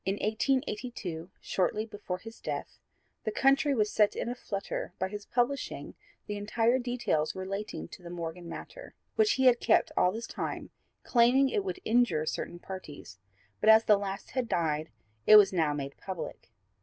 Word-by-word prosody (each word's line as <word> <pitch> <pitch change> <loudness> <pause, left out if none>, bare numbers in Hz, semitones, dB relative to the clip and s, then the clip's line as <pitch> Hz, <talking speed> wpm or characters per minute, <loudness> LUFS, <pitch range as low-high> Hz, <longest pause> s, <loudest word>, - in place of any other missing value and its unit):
In 195 - 0
1882, 215 - -2
shortly 210 +3 0
before 205 -4 -5
his 225 +4 -11
death, - - -5 0.4
the - - -1
country 275 +4 +3
was 210 -3 +1
set 210 -1 +3
in - - -2
a - - -1
flutter 200 -6 -4
by 190 - -1
his 205 0 -7
publishing 250 +3 -1 0.3
the 205 0 -4
whole 235 +2 +4
details 245 -11 -1
relating 190 - -4
to - - -11
the 175 - -9
Morgan 170 0 -6
matter, - - -9 0.2
which 430 -1 +4
he 265 - +1
had 245 -2 +6
kept - - +3
all 180 0 +4
this 225 +3 -5
time - - -5 0.3
claiming 250 +3 +4
it 410 - 0
would 375 -1 -4
injure 225 -9 +3
certain 175 - -3
parties, 155 - -9 0.4
but 215 - +3
as 220 +1 +8
the 210 - +6
last 200 -1 -5
had 255 -3 -2
died, 155 -2 0 0.4
it 215 - +10
was 205 -2 +8
now 160 -4 +2
made 140 -1 -4
public. 190 -3 -7
210 Hz, 170 wpm, -30 LUFS, 180-245 Hz, 0.4 s, it